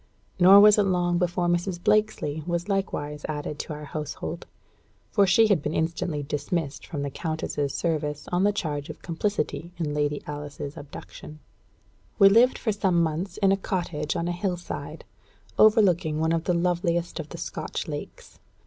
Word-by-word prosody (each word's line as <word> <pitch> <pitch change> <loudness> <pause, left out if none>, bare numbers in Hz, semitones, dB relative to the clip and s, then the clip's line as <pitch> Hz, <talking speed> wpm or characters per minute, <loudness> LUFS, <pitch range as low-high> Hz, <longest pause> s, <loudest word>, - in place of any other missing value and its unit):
Nor 190 +3 +9
was 210 0 +7
it 205 - +4
long 175 -2 +1
before 175 0 0
Mrs. 175 +1 0
Blakesley 210 -7 +1
was 175 +1 -2
likewise 150 -7 -2
added 150 -1 -4
to 155 - -4
our 150 0 -8
household, 155 +3 -5 0.6
for 200 -2 +4
she 205 +5 +5
had 200 -8 +3
been 150 +1 -3
instantly 160 -2 -1
dismissed 145 +1 -3
from 145 -4 -4
the 140 - -3
countess's 155 -3 -3
service 150 -3 -2
on 180 +1 +2
the 205 - +4
charge 150 -6 -3
of 155 - -9
complicity 170 -1 -2
in 155 -4 -2
Lady 145 0 -1
Alice's 145 -1 -6
abduction. 150 +1 -10 0.8
We 195 -2 +8
lived 235 +5 +5
for 220 - -1
some 190 -5 +2
months 165 +6 -3
in 195 -2 +3
a 195 - +3
cottage 170 -6 -3
on 170 - -1
a - - 0
hill 175 +1 -2
side, 175 - -7 0.5
overlooking 185 -8 +4
one 160 +1 +1
of 165 0 0
the 180 - +1
loveliest 170 0 0
of 155 -2 -6
the - - -8
Scotch - - -5
lakes. - - -8
170 Hz, 170 wpm, -26 LUFS, 150-190 Hz, 0.8 s, Nor